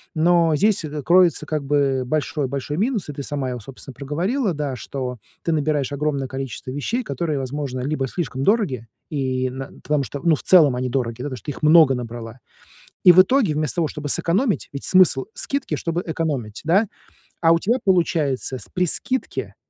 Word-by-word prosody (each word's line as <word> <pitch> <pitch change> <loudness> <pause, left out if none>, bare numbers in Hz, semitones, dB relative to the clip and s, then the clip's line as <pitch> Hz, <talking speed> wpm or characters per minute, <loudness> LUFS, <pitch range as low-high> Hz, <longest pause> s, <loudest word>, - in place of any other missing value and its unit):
Но 165 -1 +3
здесь 205 +3 +2
это 150 -1 -5
кроется 175 +4 +4
как 155 -2 -2
бы 135 -2 +1
большой 145 +1 -1
большой 140 +3 -4
минус, 215 - -1
и - - -4
ты 140 - -6
сама 135 -2 -3
его, 125 -1 -4
собственно, 135 +3 -11
проговорила, 180 - -1
да, 145 -3 -3
что 125 0 -5 0.2
ты 165 - -1
набираешь 150 -3 0
огромное 140 -2 -1
количество 135 -1 -6
вещей, 230 - -2
которые, 165 -8 -2
возможно, 135 0 -4
либо 135 0 -1
слишком 135 -3 -4
дороги, 150 - +1 0.2
и 130 -3 -1
на 135 +1 -7
потому 150 -2 +1
что, 135 +3 -6
ну, 165 -3 +4
в - - -10
целом 155 -8 +6
они 125 0 -2
дороги, 120 -2 -1
да, - - -4
потому 130 -3 -4
что - - -16
ты 145 - -3
их 145 - -11
много 155 -3 +6
набрала, 120 0 -7 0.6
и 180 - +10
в 185 - +9
итоге, 220 - +2
вместо 150 -1 -2
того, 165 -3 +1
чтобы 150 -1 -6
сэкономить, 200 - +1
ведь 140 - -6
смысл 185 -8 +4
скидки, 280 - -2
чтобы 165 +4 -2
экономить, 145 -10 -3
да, 195 +7 +3 0.5
а 165 - +5
у 165 - +2
тебя 235 +8 +1
получается 160 -8 +1
с - - -11
при 180 0 +1
скидке, 260 - -2
150 Hz, 190 wpm, -22 LUFS, 135-170 Hz, 0.6 s, и